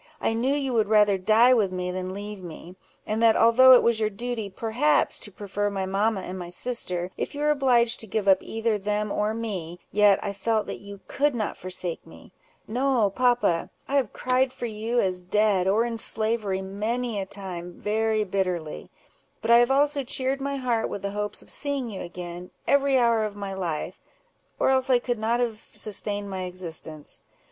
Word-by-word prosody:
I - - 0
knew 255 +5 +1
you 270 -3 -1
would 220 -3 +2
rather 210 -2 +4
die 225 +6 +5
with 210 -6 +2
me 180 0 -3
than 185 0 -4
leave 205 0 -7
me; 175 +1 -10 0.3
and 215 +1 -2
that 225 -1 +5
although 255 +3 +7
it 250 - +7
was 235 -1 +3
your 215 -1 +1
duty, 225 0 -4
perhaps, 230 +9 +1
to 205 - -8
prefer 205 +1 -2
my 195 -1 -2
mamma 200 +2 0
and 185 0 -6
my 175 -1 -6
sister, 180 -3 -3
if - - -4
you 290 - -4
were 300 0 +3
obliged 245 -5 +3
to 220 - -6
give 210 0 -2
up 190 -1 +5
either 225 -1 -1
them 210 +1 -1
or 210 +2 0
me, 190 -7 -4
yet 205 -1 +5
I 200 - -3
felt 215 +2 0
that - - -6
you 200 -1 -11
could 285 -1 +1
not 215 -3 -2
forsake 180 -2 -5
me. - - -15 0.4
No, 245 -3 +1
papa! 245 -7 +2 0.2
I 280 - +1
have 255 -6 +1
cried 255 +1 +1
for 245 - -6
you, 225 +2 -1
as 185 -3 0
dead, 195 0 +2
or 215 +4 +3
in 230 -1 -3
slavery, 215 -4 +1
many 215 +4 -2
a 190 - -4
time, 180 -3 -7
very 215 +2 0
bitterly; 180 -5 -3 0.5
but 225 - 0
I 235 - +8
have 240 +1 +4
also 285 +1 +2
cheered 265 +1 -1
my 280 0 -2
heart 245 -4 0
with 200 - -6
the 200 - -2
hopes 210 0 -4
of - - -10
seeing 280 -5 -3
you 195 - -6
again, 175 0 -7 0.2
every 280 -1 +3
hour 235 -3 +3
of 210 -1 -4
my 200 -1 -5
life, 175 -5 -4 0.6
or - - +3
else 260 0 +1
I 255 - +6
could 240 -1 -2
not 230 +2 +1
have 235 -3 -1
sustained 205 -2 -4
my 190 -1 -4
existence. 165 -4 -6
215 Hz, 200 wpm, -25 LUFS, 190-240 Hz, 0.6 s, I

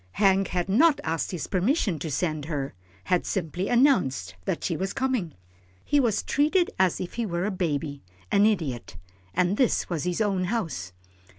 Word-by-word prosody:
Hank 195 -2 +3
had 180 -1 -1
not 280 +10 +4
asked 160 +1 -1
his 175 -4 -4
permission 195 - +1
to 160 - -4
send 155 0 -1
her 145 -4 -3 0.3
had 180 - +1
simply 180 0 -2
announced 185 - +3
that - - -2
she 170 - 0
was 190 +4 -2
coming. 250 - -1 0.5
He 290 - +3
was 230 -6 +1
treated 310 +5 +2
as 185 -2 +3
if 180 - -5
he 235 - -2
were 175 0 -1
a 210 - 0
baby 150 -6 -2 0.3
an 205 +1 +5
idiot, 145 - -2 0.4
and 180 +3 +2
this 250 -7 +1
was 165 -2 -1
his 180 +1 -1
own 195 -4 +1
house. 165 - -3
185 Hz, 175 wpm, -26 LUFS, 160-215 Hz, 0.5 s, an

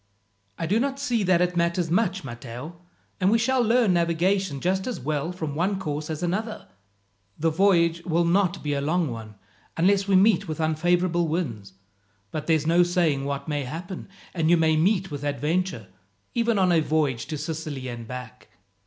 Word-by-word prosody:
"I - - -2
do 200 +7 +2
not 275 +2 -1
see 245 -5 0
that 185 -3 +3
it 180 0 -1
matters 170 0 0
much, 190 -1 +1
Matteo; 125 +6 -8 0.4
and 185 - +3
we 225 - +4
shall 255 +3 +2
learn 230 -3 +3
navigation 170 -1 +1
just 190 - 0
as 250 - -3
well 150 +4 -2
from 160 -5 -4
one 185 +6 0
course 150 -4 -4
as 155 +1 -4
another. 215 +6 -3 0.7
The 165 +1 +1
voyage 170 -2 +3
will 170 0 +1
not 180 +1 +1
be 145 -1 -1
a 140 - -1
long 160 0 0
one, 110 -2 -8 0.4
unless 195 +3 +3
we 195 - +3
meet 200 0 +4
with 155 0 -4
unfavourable 175 +2 +1
winds; 115 - -3 0.6
but 155 - -5
there's 160 -2 +2
no 170 +2 +4
saying 170 -6 +1
what 140 +1 -3
may 145 -2 -1
happen, 175 +9 -7 0.2
and 165 -3 +1
you 175 - +6
may 160 -1 +3
meet 190 +3 +1
with 145 -1 -5
adventure, 145 - -1 0.5
even 235 -2 +1
on 185 -2 +3
a 170 - +4
voyage 150 -6 0
to 155 - -4
Sicily 150 -4 -5
and 120 -2 -7
back." 125 -1 -8
170 Hz, 180 wpm, -25 LUFS, 150-185 Hz, 0.7 s, you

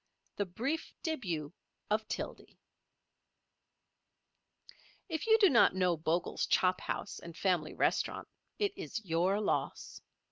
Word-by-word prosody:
THE 205 - 0
BRIEF 265 - -3
DÉBUT 175 - -2 0.4
OF 215 0 +1
TILDY - - -6 2.5
If 325 +1 -3
you 445 0 +7
do 415 -3 +7
not 240 - +5
know 180 -2 +3
Bogle's 165 +2 -1
Chop 185 0 +3
House - - -4
and 170 -1 -10
Family 175 -5 0
Restaurant - - 0 0.3
it 410 -1 0
is 230 - -5
your 180 +4 +2
loss. 215 - -2
195 Hz, 115 wpm, -33 LUFS, -, 2.5 s, you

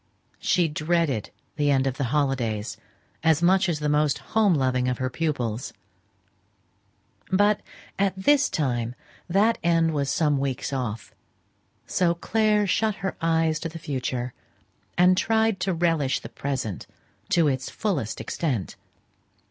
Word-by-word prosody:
She 175 -2 +2
dreaded 155 - 0 0.3
the 145 -1 +2
end 135 -1 +3
of 135 -1 -1
her 140 - -1
holidays 125 -6 -1 0.5
as 160 0 +3
much 185 +1 +4
as 165 - 0
the 150 0 -2
most 150 -1 +2 0.2
home 210 -5 +4
loving 130 -2 +1
of 125 -1 0
her 130 0 -2
pupils. 125 -7 -2 1.6
But 205 +2 +3 0.4
at 195 -1 +2
this 275 +7 +3
time 120 -5 -1 0.3
that 210 +6 +3
end 165 -1 +3
was 140 -2 -1
some 145 -1 +2
weeks 135 0 -2
off, 115 -5 -4 0.7
so 170 -2 +1
Clare 210 +3 +2
shut 210 +2 +1
her 190 - -2
eyes 165 -1 +2
to 165 - -4
the 165 - -8
future, 125 -5 -3 0.6
and 180 +1 +6
tried 220 0 +2
to 190 +1 0
relish 165 -5 +1
the - - -8
present 130 -9 -4 0.4
to 170 -5 +3
its 130 -2 -1
fullest 155 - -2
extent. 130 - -2
155 Hz, 140 wpm, -25 LUFS, 130-180 Hz, 1.6 s, and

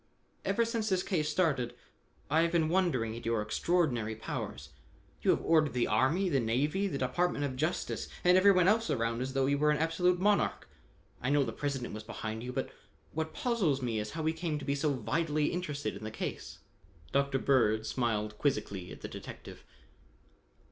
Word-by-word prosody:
"Ever 200 +5 +2
since 230 -1 -1
this 185 -2 +1
case 155 -5 0
started, 150 -8 +1 0.5
I 155 +3 +3
have 170 0 +2
been 165 -2 +2
wondering 160 -12 +1
at 115 - -8
your 115 -1 0
extraordinary 120 -1 0
powers. 70 -9 -5 0.5
You - - 0
have - - +3
ordered 155 -3 +3
the 125 -1 +2
army, 135 - +2
the 140 -6 +2
navy, 145 - +1
the 145 - -3
department 145 +4 0
of 130 -2 -3
justice 155 +7 -2 0.2
and 180 0 +6
everyone 185 -1 +6
else 225 +3 +3
around 115 0 0
as 130 +1 -3
though 135 -1 +2
you 140 +1 +1
were 150 0 +3
an 150 - +3
absolute 175 +3 +2
monarch. 205 +2 +1 0.5
I 125 - -1
know 145 0 +4
the 115 -4 -4
President 140 -4 -3
was 110 - -5
behind 110 0 -5
you, 125 +1 -5
but - - -3 0.4
what 160 0 -3
puzzles 215 - +1
me 115 -3 -1
is 105 0 -3
how 160 -1 -3
he 160 - +2
came 160 -2 -2
to 150 - -7
be 140 - +1
so 145 +1 +1
vitally 150 +4 0
interested 145 - -3
in 100 - -9
the 110 - -3
case." 110 - -5 0.5
Dr. 140 0 +2
Bird 110 -5 +2
smiled 105 -4 -1
quizzically 100 -9 -1
at - - -10
the - - -5
detective. - - -10
145 Hz, 190 wpm, -31 LUFS, 120-170 Hz, 0.5 s, and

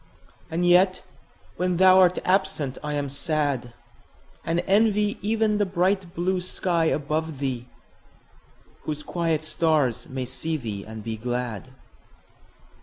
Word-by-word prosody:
And 170 +2 0
yet 185 +2 +4 0.5
when 180 -1 0
thou 185 +1 +7
art 180 -1 +5
absent 170 -8 0
I 150 0 -2
am 145 -1 -1
sad; 140 -4 -1 0.7
And 170 +1 0
envy 210 0 +2
even 215 0 +1
the 205 - +3
bright 185 0 0
blue 185 +2 0
sky 175 -2 0
above 155 0 -1
thee, 130 -3 -3 1.2
Whose 150 -1 -4
quiet 165 -2 -1
stars 155 -5 0
may 130 -1 -3
see 155 +5 -3
thee 105 -7 -5
and 110 -1 -9
be 110 0 -4
glad. 120 0 -4
160 Hz, 125 wpm, -25 LUFS, 135-185 Hz, 1.2 s, thou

